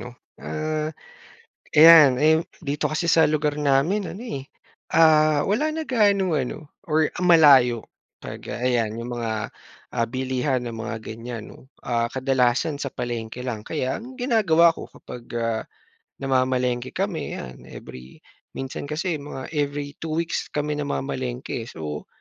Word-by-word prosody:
'no, 125 0 -9 0.2
ah, 155 0 -2 0.8
ayan. 155 -5 +8
Eh 160 +2 +4 0.2
dito 145 -3 -3
kasi 165 +2 -1
sa 160 0 +5
lugar 150 -1 0
namin 150 +8 +1
ano 195 - -9
eh, 140 - -5 0.5
ah, 155 -2 +5
wala 295 +10 +1
na 320 0 -5
ganong 200 -8 +3
ano 150 +3 -4 0.2
or 155 -3 +2 0.2
malayo 140 -9 +6 0.3
pag, - - -8
ah, - - -5
ayan 120 -3 +1
'yung 120 - -6
mga 110 -2 -3 0.5
ah, 115 - +2
bilihan 130 +2 -1
ng 115 - -6
mga 115 +1 -4
ganiyan 115 0 -7
'no, - - -15 0.2
ah, 115 -1 -1
kadalasan 130 +2 +1
sa 140 -2 -5
palengke 120 -1 -5
lang 120 -4 -4
kaya 130 -5 -2
ang 250 +3 -10
ginagawa 205 -10 +4
ko - - -7
kapag, 120 -1 -11 0.2
ah, 115 -1 -1 0.6
namamalengke 130 -2 0
kami 185 -6 -3
yan, 65 0 -9
every 65 +1 -11 0.3
minsan 135 +2 -6
kasi 165 +3 -1
mga 140 -3 -6
every 145 -1 -2
2 160 - -4
weeks 170 0 -2
kami 150 0 -2
namamalengke 130 -4 -3
so, 75 -9 -6
140 Hz, 145 wpm, -24 LUFS, 125-160 Hz, 0.8 s, ayan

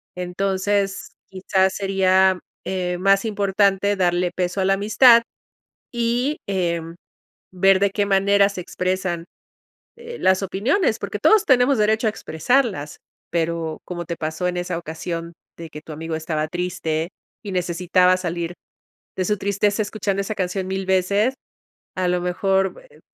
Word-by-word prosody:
Entonces 195 +2 -1 0.2
quizás 190 0 +1
sería, 190 -1 +3 0.3
eh, 180 -1 -2
más 195 +2 +3
importante 200 -1 +1
darle 175 -1 +1
peso 180 +1 -2
a - - +1
la 195 - +3
amistad 230 +4 +6 0.7
y, 240 +5 0
em, 170 -3 -2 0.6
ver 190 +1 +4
de 200 0 +2
qué 205 +1 0
manera 200 0 +3
se 200 - -7
expresan, 180 -1 -2 0.7
eh, 470 0 -9
las 190 +1 +3
opiniones, 220 - 0
porque - - -5
todos 435 -2 +5
tenemos 260 0 +4
derecho 220 +2 +2
a - - +2
expresarlas, 195 - -1 0.3
pero 165 -1 -2
como 175 -1 -5
te 170 - -4
pasó 160 +3 -2
en 180 - -3
esa 175 -1 -3
ocasión 170 +1 -5 0.3
de 165 -2 -8
que 150 - -9
tu 155 - -10
amigo 160 +1 -4
estaba 155 -1 -2
triste, 170 -1 -2 0.3
y 200 - -5
necesitaba 180 +1 +2
salir 175 -1 -4 0.6
de 185 - 0
su 210 +2 0
tristeza 200 +2 0
escuchando 205 -2 -2
esa 210 +2 -4
canción 185 0 -2
1000 190 0 -3
veces, 200 +6 +2 0.6
a 185 -1 0
lo 180 0 +1
mejor, 190 - 0
eh, - - -20
190 Hz, 145 wpm, -22 LUFS, 175-200 Hz, 0.7 s, amistad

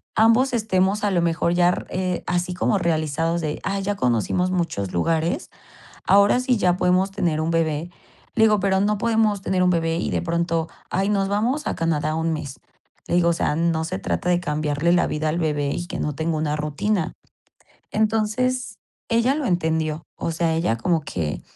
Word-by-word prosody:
ambos 230 +4 +4
estemos 205 -2 +1
a 200 - +1
lo 175 - +2
mejor 170 0 +1
yar 175 0 +2
eh, 185 -1 -2
así 175 0 -1
como 200 - +1
realizados 165 0 0
de, 155 -1 -3
ay, 195 0 -2
ya 205 +1 -1
conocimos 125 - 0
muchos 165 - -2
lugares, 160 - 0 0.6
ahora 200 +4 +5
sí 255 -1 +1
ya 180 -3 +2
podemos 185 +2 +2
tener 170 -6 0
un 160 +1 -1
bebé". 165 0 0 0.5
Le 220 - +4
digo: 210 -1 +3
"Pero 190 0 +2
no 210 +1 +1
podemos 220 -3 +1
tener 185 -1 0
un 180 - +4
bebé 165 -1 0
y - - -2
de - - 0
pronto, 170 -1 -1 0.2
ay, 195 +2 0
nos 195 -2 +1
vamos 240 +9 0
a - - 0
Canadá 155 -2 0
un 160 0 0
mes". 140 -4 -6 0.5
Le - - 0
digo: 175 -1 +4
"O - - +3
sea, 150 - 0
no 165 -1 +1
se 185 +3 -3
trata 180 - -2
de 175 -1 +3
cambiarle 150 0 0
la 175 - +3
vida 155 +1 -1
al 165 +3 -1
bebé 150 -3 0
y 175 +3 -4
que - - -5
no 150 - -1
tenga 160 +1 -1
una 150 -1 -1
rutina". 160 +5 -1 0.8
Entonces, 220 +2 0 0.3
ella 235 +3 +3
lo 300 0 -2
entendió. 160 -4 0
O - - -3
sea, 165 0 0
ella 160 -8 0
como 165 +6 +1
que, 80 - -4
175 Hz, 190 wpm, -23 LUFS, 160-200 Hz, 0.8 s, ahora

